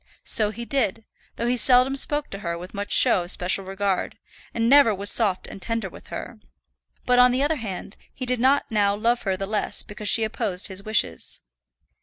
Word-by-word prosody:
So 215 -2 +3
he 235 +3 -7
did, 225 -5 -1 0.3
though 235 - -3
he 245 +1 +1
seldom 255 +2 +4
spoke 295 +2 -1
to 195 - -4
her 170 -3 -4
with 180 +2 -10
much 205 0 -6
show 185 - +5
of 175 - -8
special 185 +2 -1
regard, 195 0 -2 0.3
and 230 0 -1
never 265 -5 +5
was 200 +1 +1
soft 200 -5 +2
and 195 - -10
tender 230 -3 -3
with - - -15
her. 235 -2 -8 0.7
But, 250 0 +3
on 250 0 +6
the 255 +2 0
other 305 +2 0
hand, 200 -4 -7
he 255 - -7
did 250 -1 -1
not 270 +3 +3
now 205 -2 +2
love 235 +3 0
her 190 - 0
the 195 - -3
less 210 +1 -1
because 210 0 -3
she 225 - +4
opposed 215 -4 -2
his 190 0 -5
wishes. 210 - -1
215 Hz, 205 wpm, -23 LUFS, 195-245 Hz, 0.7 s, on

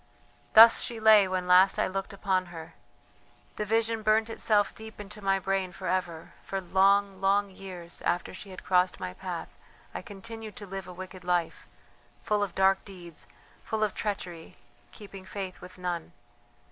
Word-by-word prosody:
Thus 225 +1 +9
she 235 -2 -3
lay 215 -3 +7
when 185 -1 -2
last 185 +2 +6
I - - +2
looked 195 0 -4
upon 190 -2 -1
her; 165 -2 -10 0.8
the 210 - -2
vision 225 +1 +1
burnt 220 +1 +2
itself 210 -2 +2
deep 220 -1 -11
into 210 +1 -8
my 195 0 +2
brain 195 -1 -1
for 185 - -9
ever. 175 -3 -2
For 195 - -4
long, 195 +1 +2
long 200 +1 +2
years 180 -3 -8
after 175 - -1
she 195 +2 -9
had 185 - -10
crossed 180 0 +2
my 90 - -5
path - - -6 0.4
I - - -5
continued 215 +1 -9
to 205 - -8
live 195 -1 -7
a - - -8
wicked 185 0 -9
life, 175 -2 -1 0.6
full 210 -1 0
of 200 -4 -2
dark 195 0 +3
deeds, 175 -5 -13 0.4
full 220 -1 -2
of 210 - 0
treachery, 185 -6 -5 0.3
keeping 195 -2 -11
faith 185 0 -6
with 180 0 -12
none. 175 -2 -4
195 Hz, 170 wpm, -28 LUFS, 180-210 Hz, 0.8 s, Thus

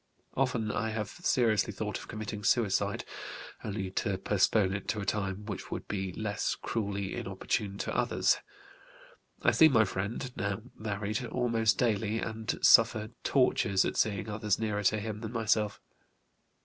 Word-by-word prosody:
Often 125 -5 0
I 110 - -1
have 110 -2 -3
seriously 115 - +1
thought 105 0 -4
of - - -11
committing 105 -1 -5
suicide, 110 -3 +1 0.6
only 100 -3 -3
to 95 0 -1
postpone 95 0 +2
it 100 -1 -4
to 105 - -1
a 100 - -3
time 100 -1 -2
which 105 -3 -6
would - - -5
be 95 -2 -2
less 105 0 -1
cruelly 100 -3 -3
inopportune 100 +1 -2
to - - -3
others. - - +2 1.1
I - - +5
see 160 - +7
my 115 -7 +4
friend 110 +7 -4
(now 100 +2 -2
married) 105 +2 -3
almost 115 -2 +1
daily, 110 -2 +1
and 110 0 -3
suffer 110 -1 +6
tortures 100 -7 +3
at - - -2
seeing 100 -2 0
others 105 -1 0
nearer 105 -2 -1
to 110 - +3
him 105 0 -5
than 115 0 -5
myself. 110 -2 +1
105 Hz, 150 wpm, -30 LUFS, 100-115 Hz, 1.1 s, see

